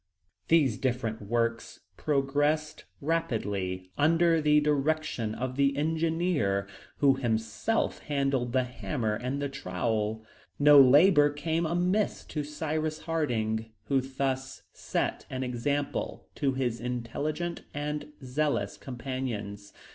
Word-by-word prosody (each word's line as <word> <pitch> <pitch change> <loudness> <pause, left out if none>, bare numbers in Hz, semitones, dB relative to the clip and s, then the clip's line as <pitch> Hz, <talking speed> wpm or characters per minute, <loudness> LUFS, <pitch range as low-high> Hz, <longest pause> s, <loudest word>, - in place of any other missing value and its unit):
These 145 -9 +3
different 120 -4 -1
works 115 +2 -1
progressed 145 +2 0 0.2
rapidly 100 - -2
under 165 +2 +4
the 150 0 +5
direction 150 -6 0
of 130 +1 -4
the 140 0 +2
engineer, 160 - +1 0.3
who 135 -2 +4
himself 110 - -1
handled 135 -4 0
the 130 +1 +2
hammer 125 -2 -2
and 125 +5 -3
the 140 - -1
trowel. 110 -3 -2 0.3
No 145 -1 +8
labor 145 +3 +6
came 160 +3 -1
amiss 180 +5 0
to 150 - -2
Cyrus 155 +1 -3
Harding, 115 -9 -1 0.2
who 135 -2 +3
thus 135 0 -3
set - - -2
an 130 0 -3
example 140 +4 -2
to 140 -3 0
his 125 -3 -1
intelligent 135 +8 -3
and 150 +1 -4
zealous 130 -6 -1
companions. 120 -6 -5
135 Hz, 110 wpm, -29 LUFS, 115-150 Hz, 0.3 s, No